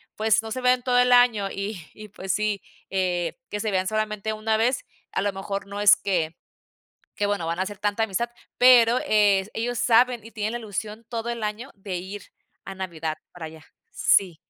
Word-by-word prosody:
pues 220 0 +3
no 225 - -7
se 255 +3 -3
ven 250 0 +3
todo 250 0 +1
el 250 0 +4
año. 235 -5 +5
Y 200 0 -4
y 215 0 -11
pues 190 -1 -3
sí, 210 -1 -1 0.3
eh, 180 0 -1
que 210 - -3
se 220 - -1
vean 185 -1 +1
solamente 215 0 -2
una 220 0 0
vez, 245 +3 +1 0.3
a - - -1
lo 205 0 0
mejor 195 0 -5
no 200 +1 -6
es 205 -1 +7
que 170 -5 -1 0.8
que 205 - +1
bueno 205 -5 -1
van 170 +2 -2
a - - +1
hacer 205 0 -5
tanta 205 +2 0
amistad, 220 +3 -1 0.3
pero 245 -1 +7
es 205 -2 +3
ellos 240 +1 -2
saben, 240 0 +3
y 225 +2 -13
tienen 215 +1 -2
la 240 - -3
ilusión 215 +1 -6
todo 235 0 -3
el 235 -1 -5
año 215 +6 -4
de 195 -2 -6
ir 190 +3 -7 0.4
a 195 - -6
Navidad 165 -4 -4 0.2
para 170 -3 -7
allá. 160 0 -12 0.3
Sí 180 -5 +2
210 Hz, 205 wpm, -25 LUFS, 195-225 Hz, 0.8 s, es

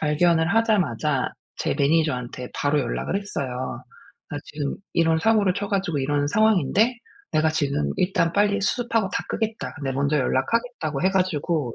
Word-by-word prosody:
발견을 160 +3 +2
하자마자 165 - +1 0.2
제 - - -1
매니저한테 140 -5 0
바로 145 +1 +1
연락을 160 - -2
했어요. 130 -11 -4 0.5
나 - - -4
지금 145 -2 -4 0.2
이런 165 -1 +3
사고를 205 -1 +3
쳐 200 +1 -3
가지고 190 -6 -1
이런 145 +1 0
상황인데 215 - +3 0.4
내가 155 +1 +3
지금 140 - 0
일단 180 -2 +1
빨리 205 +1 +2
수습하고 225 0 0
다 - - -1
끄겠다. 220 0 -3
내가 135 -1 -2
먼저 140 +2 +1
연락하겠다고 155 - -1
해 190 - +3
가지고 165 -8 0
160 Hz, 355 characters per minute, -24 LUFS, 140-200 Hz, 0.5 s, 이런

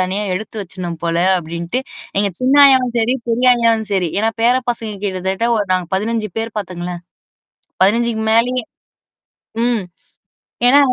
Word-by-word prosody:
தனியா 185 +3 0
எடுத்து 220 +3 -6
வச்சுறணும் 175 -3 -6
போல 170 0 -1 0.2
அப்பிடின்ட்டு, 170 +7 -4 0.4
எங்க 200 -1 +1
சின்ன 255 +2 +2
ஆயாவும் 255 -3 +4
செரி, 235 +3 +2
பெரிய 240 +2 +1
ஆயாவும் 230 -2 +1
செரி. 185 -3 +1
ஏன்னா 220 +2 +1
பேர 240 +2 +4 0.2
பசங்க 225 -2 -4
கிட்டத்தட்ட 190 +3 -1
ஒரு 205 -2 -1
நாங்க 185 -1 0
15 215 +2 -1
பேர் 225 -1 -4
பாத்துங்களேன். 180 -3 -5 0.8
15க்கு 225 +3 +2
மேலயே! 245 +2 +2 1.0
ம். 240 -4 +1 0.9
ஏன்னா 280 +3 +6
220 Hz, 135 wpm, -17 LUFS, 185-235 Hz, 1.0 s, ஏன்னா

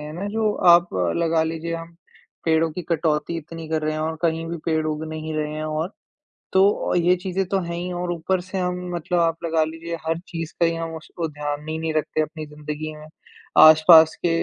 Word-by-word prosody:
हैं 150 0 -7
ना, 185 +5 -5
जो 215 0 0 0.2
आप 175 +1 +5 0.3
लगा 165 -1 +2
लीजिए 165 +1 -3
हम, 165 0 -8 0.5
पेड़ों 160 0 +2
की 180 - -5
कटौती 160 0 0
इतनी 165 0 -8
कर 160 -1 -1
रहे 155 0 0
हैं 155 - -3
और 160 +1 -2
कहीं 165 -1 0
भी 170 +1 -4
पेड़ 160 -1 0
उग 155 0 -2
नहीं 155 0 -5
रहे 150 0 -2
हैं 155 - -4
और 155 +5 -2 0.6
तो 195 +2 +3
ये 175 +1 +4
चीज़ें 185 +1 -2
तो 195 +1 0
हैं 170 0 -4
ही 180 +1 -4
और 175 0 -3
ऊपर 175 +2 -1
से 185 +2 -6
हम 180 -1 -1 0.2
मतलब 175 +1 -1
आप 165 -1 +2
लगा 160 -1 +2
लीजिए 165 +2 -5
हर 165 +1 0
चीज़ 165 -2 -5
का 170 - +4
ही 165 0 +1
हम 165 0 -4
उस 160 - -11
उ 165 - 0
ध्यान 150 +1 -4
ही 160 - -3
नहीं 160 -1 -2
रखते 155 0 0
अपनी 155 +1 -5
ज़िंदगी 150 +1 -6
में, 150 0 -12 0.5
आस-पास 160 +1 +8
के 175 - +3
165 Hz, 220 wpm, -23 LUFS, 155-170 Hz, 0.6 s, आस-पास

